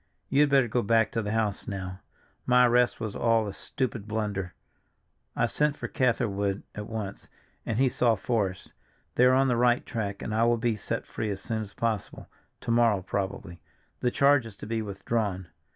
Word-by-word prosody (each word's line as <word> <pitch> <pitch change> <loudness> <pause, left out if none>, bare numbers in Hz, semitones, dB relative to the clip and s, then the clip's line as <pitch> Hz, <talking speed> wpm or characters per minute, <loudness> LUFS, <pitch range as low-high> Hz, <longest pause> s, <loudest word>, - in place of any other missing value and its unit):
"You 140 +2 +4
had 150 - +4
better 135 -3 +4
go 120 +2 0
back 115 0 +3
to 115 - -1
the 105 - -4
house 110 -2 -1
now. 95 -2 -5 0.5
My 125 0 +6
arrest 125 0 +3
was 110 -3 -4
all 115 -2 +2
a 100 - -5
stupid 115 -2 -4
blunder; 105 -4 -3 0.8
I - - +2
sent 150 -1 0
for - - -4
Catherwood 100 -7 0
at 105 0 -6
once, 105 -3 -6 0.4
and 110 - -1
he 135 +2 +4
saw 120 -2 +2
Forrest. 100 -4 -2 0.4
They 125 - +4
are 130 0 +6
on 135 +1 +4
the 125 - +2
right 120 0 +3
track 100 -3 -4
and 110 - -3
I 110 +1 +2
will 120 0 +3
be 115 -1 0
set 105 - -4
free 110 - -4
as 100 -1 -3
soon 110 +2 -3
as 100 -2 -8
possible, 110 -4 -3 0.3
to - - -2
morrow, 115 -5 +3
probably; 95 -3 -4 0.4
the 125 - +1
charge 140 -1 +4
is 110 - -11
to - - -9
be 115 +1 -2
withdrawn. 100 -2 -2
110 Hz, 195 wpm, -28 LUFS, 100-120 Hz, 0.8 s, My